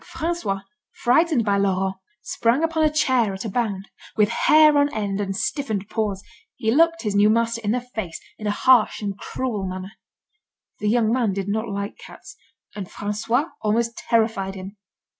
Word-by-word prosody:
François, 325 - -2 0.3
frightened 275 -1 +2
by 200 -1 +2
Laurent, 190 -1 0 0.3
sprang 235 +8 +1
upon 325 -1 +1
a 310 - +5
chair 255 -9 +2
at 190 - -7
a - - -2
bound. 200 -3 -2 0.3
With 210 -1 +4
hair 305 +5 +5
on 285 0 +3
end 205 -2 -2
and 195 -1 -3
stiffened 215 -7 -2
paws, 210 -4 -2 0.3
he 220 - 0
looked 330 +2 +3
his 210 -2 -1
new 205 +1 +5
master 230 +1 +1
in 205 - -1
the 245 +3 +1
face, 220 -9 -6 0.2
in 215 - -4
a 205 - -2
harsh 250 -4 +5
and 200 -1 -2
cruel 210 -2 -4
manner. 185 +1 -6 0.9
The 210 - 0
young 225 -1 +2
man 235 -6 +1
did 195 0 -3
not 220 +2 -2
like 200 0 -4
cats, - - -12 0.4
and 200 -3 -5
François 225 +8 -1
almost 230 +2 0
terrified 220 -4 0
him. 190 +2 -8
220 Hz, 175 wpm, -23 LUFS, 200-250 Hz, 0.9 s, a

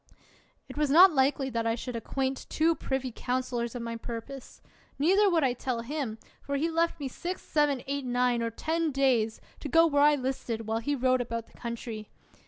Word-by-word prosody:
It - - -10
was 300 -1 +1
not 350 +5 +8
likely 270 0 +1
that 230 -1 -1
I 225 - +1
should 245 +1 -6
acquaint 265 +3 -3
two 325 +2 +2
privy 265 -4 -3
counselors 245 -2 -2
of 240 - -4
my 230 0 -4
purpose; 235 +3 -8 0.4
neither 385 +8 +4
would 335 -4 +2
I 255 -2 +2
tell 245 -1 -3
him, 250 -3 -4 0.2
for 280 - -3
he 320 +4 0
left 335 0 0
me 280 - -3
six, 355 +8 -5
seven, 290 -4 +1
eight, 280 0 -3
nine, 245 -1 +1
or 230 - 0
ten 320 +7 -1
days, 250 -5 +1 0.2
to 290 - -6
go 330 +5 +6
where 285 -3 +2
I 295 0 +6
listed, 255 -4 -3
while 220 +1 -1
he 285 +5 -1
rode 255 -1 +2
about 230 -1 -4
the - - -25
country. 230 -2 -6
265 Hz, 195 wpm, -29 LUFS, 235-295 Hz, 0.4 s, not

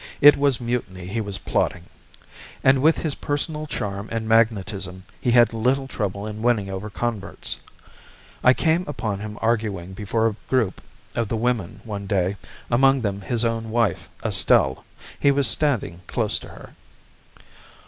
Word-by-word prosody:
It 145 +1 +9
was 140 -3 +2
mutiny 115 -7 -3
he 110 +5 -2
was 100 -2 0
plotting! 90 -2 -1 0.8
And 130 0 +5
with 160 +3 +4
his 155 -3 +1
personal 150 +2 -3
charm 100 -5 -4
and 115 -1 -2
magnetism 100 -5 +1
he - - -1
had 120 -2 +5
little 130 +4 +1
trouble 100 -4 -3
in 110 0 -6
winning 110 -5 +1
over 95 +3 -5
converts. 110 -1 -3 0.8
I 130 0 +6
came 165 +2 +2
upon 110 -9 -3
him 105 0 -7
arguing 105 -6 -1
before 105 +3 -1
a 110 -2 +1
group 115 -8 +1 0.3
of 115 -2 -1
the 115 - -2
women 115 -6 -1
one 100 -3 -6
day, 95 -1 0 0.3
among 135 +2 +4
them 100 -2 -2
his 115 +3 0
own 115 -1 -1
wife, 115 -5 0 0.2
Estelle. 65 -1 +3 0.3
He 140 - +4
was 140 -1 +4
standing 125 - +1
close 110 -3 +1
to - - -11
her. - - -13
110 Hz, 155 wpm, -23 LUFS, 100-125 Hz, 0.8 s, It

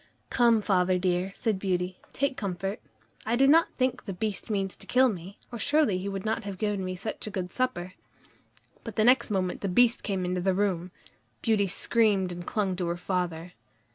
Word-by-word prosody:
"Come, 235 -3 +4
father 185 -2 +2
dear," 180 +1 0
said 215 -4 -1
Beauty, 185 -1 -1
"take 275 -1 0
comfort. 195 0 -3 0.4
I 230 - 0
do 270 +3 +4
not 320 +4 +6
think 255 -1 0
the 195 - -4
Beast 205 +3 -3
means 195 -3 -1
to - - -12
kill 260 +1 +5
me, 190 -1 -7
or 235 - -6
surely 285 -7 +2
he 195 +2 -3
would 195 0 -5
not 220 +1 -1
have 200 -2 -6
given 205 -1 -1
me 185 0 -3
such 205 +3 -5
a - - -2
good 185 -3 -4
supper." 220 -9 -2 0.9
But - - -7
the 215 - +3
next 250 0 +5
moment 185 -3 -1
the 200 - -1
Beast 240 +5 +4
came 190 -3 -2
into 180 0 -1
the 190 0 +1
room. 185 -3 0 0.5
Beauty 215 -3 +2
screamed 200 -1 +2
and 175 0 -7
clung 200 -4 0
to 180 -2 -1
her 170 +1 -1
father. 180 -1 -3
195 Hz, 200 wpm, -28 LUFS, 180-225 Hz, 0.9 s, not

